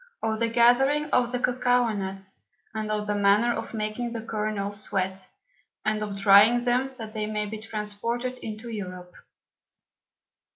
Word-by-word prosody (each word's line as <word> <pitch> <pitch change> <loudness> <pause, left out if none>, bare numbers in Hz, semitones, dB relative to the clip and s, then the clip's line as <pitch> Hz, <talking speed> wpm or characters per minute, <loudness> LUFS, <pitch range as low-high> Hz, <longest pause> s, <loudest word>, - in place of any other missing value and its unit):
Of 220 -1 0
the 230 - +2
gathering 265 +6 +3
of 245 -1 +2
the 250 - 0
Cocao 245 -1 +2
Nuts, 195 -1 -5 0.3
and 215 -1 -3
the 210 -1 -1
Manner 205 +4 +3
of - - -5
making 220 +3 -3
them 215 -3 -3
sweat, 190 -2 -1 0.6
and 215 0 0
of 205 -2 -4
drying 210 +4 +6
them 250 +2 +1
that 220 -3 -8
they 215 -1 -2
may 210 -1 -1
be 215 +1 -7
brought 210 -1 -3
sound 230 +4 -3 0.2
into 220 +2 -6
Europe. 180 -4 -7
215 Hz, 150 wpm, -26 LUFS, 205-240 Hz, 0.6 s, drying